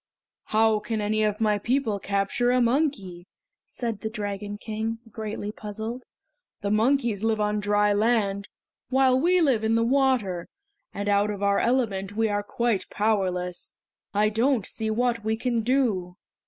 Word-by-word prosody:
"How 220 0 +3
can 215 +1 -3
any 215 +1 0
of 210 -1 0
my 210 -2 +2
people 235 -2 0
capture 200 +5 0
a 250 0 +3
monkey?" 230 - 0 0.4
said 230 -4 -4
the 220 - -3
Dragon 205 -1 -5
King, 220 +1 -3
greatly 210 -1 -5
puzzled. 220 +4 -6 0.5
"The 200 - -1
monkeys 230 -1 +2
live 225 -1 +1
on 210 0 0
dry 205 0 +2
land, 205 -2 +1 0.4
while 260 0 +4
we 355 +4 +3
live 260 -8 +2
in 220 +1 +2
the 230 - +3
water; 245 -9 +1 0.4
and 205 0 -4
out 205 0 +3
of 205 -1 -4
our 200 0 +3
element 205 -6 0
we 225 -1 +2
are 205 0 0
quite 225 0 -1
powerless! 185 -4 -1 0.4
I 210 +1 +2
don't 230 0 +1
see 220 -1 -3
what 235 0 0
we 220 +1 0
can 240 -1 0
do!" 215 -8 0
215 Hz, 155 wpm, -26 LUFS, 205-235 Hz, 0.5 s, while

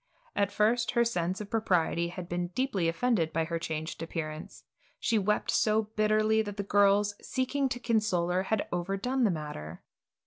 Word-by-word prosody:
At 200 0 +1
first 225 +3 +2
her 235 -1 +3
sense 185 -3 -1
of 205 - -8
propriety 180 -6 +1
had 175 0 -7
been 175 0 -2
deeply 235 -10 0
offended 170 -2 +1
by 165 0 0
her 165 +1 -3
changed 160 0 -4
appearance. 155 -2 -6 0.4
She 225 -2 +2
wept 210 +2 +1
so 215 0 +2
bitterly 215 +1 +3
that 205 -1 -6
the 200 - -1
girls, 205 +1 +3
seeking 270 +1 -1
to 245 - -3
console 215 -7 +1
her, 180 +1 +2
had 220 -2 0
overdone 195 +9 0
the - - +4
matter. 150 - -5
200 Hz, 170 wpm, -29 LUFS, 170-220 Hz, 0.4 s, the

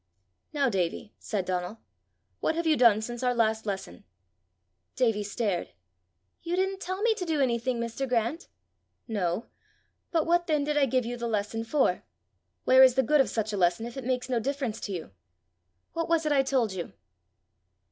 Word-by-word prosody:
"Now, 285 -2 +1
Davie," 195 -1 -2
said 200 -4 -3
Donal, 180 +4 -3 0.6
"what 320 - 0
have 335 +1 -1
you 315 -1 +4
done 230 -5 +5
since 240 +1 -5
our 250 -1 +1
last 220 -1 +1
lesson?" 190 - -5 0.9
Davie 225 -5 +2
stared. 205 -3 -2 0.7
"You 340 +1 -2
didn't 385 +1 0
tell 375 +2 -4
me 465 -1 +4
to 395 - -5
do 320 -4 -1
anything, 245 -1 +1
Mr. 235 +3 -3
Grant!" 240 +7 -1 0.6
"No; 205 -2 -1 0.6
but 325 -3 +1
what 345 +1 +2
then 305 -3 +2
did 300 +1 -1
I 285 -2 +4
give 255 -1 +1
you 245 +1 -4
the 235 0 -3
lesson 220 +1 -2
for? 265 +5 +1 0.6
Where 260 0 +6
is 260 -2 +7
the 265 - +3
good 295 +4 +4
of 255 - 0
such 220 0 -2
a - - -1
lesson 175 +4 +2
if 235 - -8
it 270 - -5
makes 250 0 -1
no 250 -2 0
difference 265 -2 -2
to 205 - -5
you! 170 - -5 0.8
What 330 0 -2
was 330 -1 +2
it 305 - +1
I 280 -2 +5
told 260 -6 0
you?" 180 -2 -6
245 Hz, 185 wpm, -28 LUFS, 215-290 Hz, 0.9 s, is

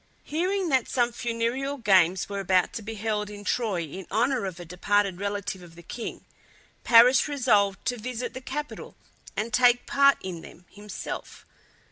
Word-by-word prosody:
Hearing 365 +4 -1
that 265 -4 +2
some 240 -1 +1
funereal 240 +4 -2
games 185 -6 +3
were 200 0 -4
about 185 -2 +2
to - - -5
be 220 +1 -6
held 210 -1 -2
in 205 0 -9
Troy 205 -6 -1
in 170 +4 -8
honour 240 +2 +1
of 180 -2 -7
a 175 - -8
departed 190 +2 0
relative 200 -1 -3
of 170 -2 -14
the 170 - -13
king, 230 +7 -7 0.6
Paris 245 +3 +6
resolved 215 -9 +1
to 245 - -1
visit 250 +2 -5
the 260 - -7
capital 295 +3 -6 0.4
and 215 +2 -2
take 245 +1 +4
part 280 0 +4
in 180 -3 -6
them 180 - -14
himself. 205 0 -8
220 Hz, 165 wpm, -26 LUFS, 195-250 Hz, 0.6 s, Paris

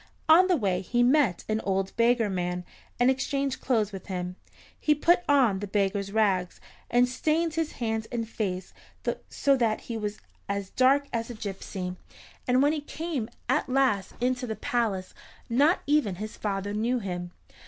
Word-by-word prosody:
On 340 +4 +7
the 365 -2 +3
way 190 -6 0
he 240 +6 +1
met 250 - +3
an 215 0 0
old 195 0 -1
beggar 235 -1 +3
man, 180 -2 -2 0.3
and 245 +2 +5
exchanged 275 0 -1
clothes 220 -5 +1
with 195 -2 -8
him. 180 -2 -4 0.4
He 300 - +3
put 345 +4 +4
on 250 -9 +4
the 205 - -4
beggar's 200 0 0
rags, 195 -4 +1 0.3
and 245 +1 +4
stained 315 +5 0
his 325 -1 -1
hands 225 -2 -2
and 230 -2 -2
face 190 -5 -3 0.6
so 280 -1 +2
that 230 -4 +1
he 230 - -5
was 210 -1 -3 0.3
as 200 -1 -3
dark 275 +2 +4
as 230 0 -2
a 240 - -6
gypsy, 190 -3 -5 0.5
and 255 +2 +4
when 290 +2 +4
he 305 - -2
came 295 -6 -4 0.2
at 260 +1 +1
last 255 -8 +1
into 250 +1 0
the 220 - -3
palace 210 -7 -1 0.4
not 290 +9 +4
even 285 -10 +2
his 215 +4 -6
father 200 -1 -3
knew 230 +4 +1
him. 180 -5 -4
225 Hz, 170 wpm, -27 LUFS, 195-265 Hz, 0.6 s, On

